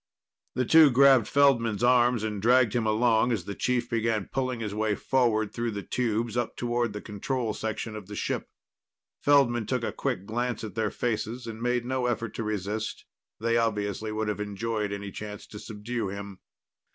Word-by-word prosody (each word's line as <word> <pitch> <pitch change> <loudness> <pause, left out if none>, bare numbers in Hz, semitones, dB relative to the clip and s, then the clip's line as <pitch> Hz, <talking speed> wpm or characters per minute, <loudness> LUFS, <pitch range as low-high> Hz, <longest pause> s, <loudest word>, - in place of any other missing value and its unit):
The 130 0 +1
two 160 +3 +7
grabbed 135 -3 +6
Feldman's 120 -6 +3
arms 120 -2 +4
and 105 -2 -3
dragged 120 0 +4
him 115 -3 0
along 115 +2 +3
as 100 -7 -1
the 100 - -4
chief 120 +2 0
began 115 -3 0
pulling 130 -2 -1
his 105 -3 -4
way 105 0 0
forward 110 -5 +1
through 120 0 -2
the 100 -2 -5
tubes 115 -1 -1
up 120 -2 -1
towards 120 -2 -1
the 105 - -5
control 110 +2 -2
section 110 0 -4
of 105 -3 -8
the 105 - -7
ship. - - -3 0.7
Feldman 120 -6 +3
took - - -1
a - - -1
quick 95 - -3
glance 120 +3 -2
at 110 - -6
their 110 -2 0
faces 120 +2 -3
and 115 -1 -7
made 125 0 0
no 130 0 -1
effort 115 -2 -2
to 115 - -4
resist; 105 +1 -3 0.3
they 115 +1 +1
obviously 110 -1 -1
would 110 0 -2
have 105 -1 -2
enjoyed 105 +1 -2
any 100 0 -5
chance 105 +1 -7
to 105 - -10
subdue 110 +1 -4
him. 100 -1 -7
115 Hz, 185 wpm, -27 LUFS, 105-120 Hz, 0.7 s, two